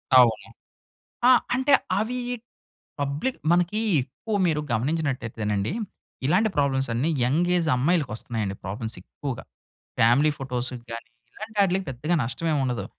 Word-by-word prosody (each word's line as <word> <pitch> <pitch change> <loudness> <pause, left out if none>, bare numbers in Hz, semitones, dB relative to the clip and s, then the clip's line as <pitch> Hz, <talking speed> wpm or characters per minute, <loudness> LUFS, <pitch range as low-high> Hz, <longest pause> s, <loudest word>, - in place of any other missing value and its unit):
అవును. 120 -4 +5 0.8
ఆ - - +9 0.2
అంటే 260 +2 +3 0.3
అవి 230 +4 -1 0.8
పబ్లిక్ 145 - -1
మనకి 175 +5 +2 0.2
ఎక్కువ 205 - -4
మీరు 155 -3 +1
గమనించినట్టయితేనండి 115 -5 -1 0.5
ఇలాంటి 190 +9 +3
ప్రాబ్లమ్స్ 135 -2 +2
అన్నీ 125 +7 +1 0.2
యంగ్ 155 +8 +2
ఏజ్ 165 -3 +1
అమ్మాయిలకొస్తున్నాయండి 120 - 0
ప్రాబ్లమ్స్ 110 +5 -4
ఎక్కువగా. 135 -5 -6 0.5
ఫ్యామిలీ 125 +7 +5
ఫోటోస్ 125 -2 -3 0.2
గాని 115 0 -7 0.2
ఇలాంటాటిలకి 200 -3 0
పెద్దగా 140 +7 -1
నష్టమేముండదు. 130 -3 -1
140 Hz, 105 wpm, -25 LUFS, 120-175 Hz, 0.8 s, ఆ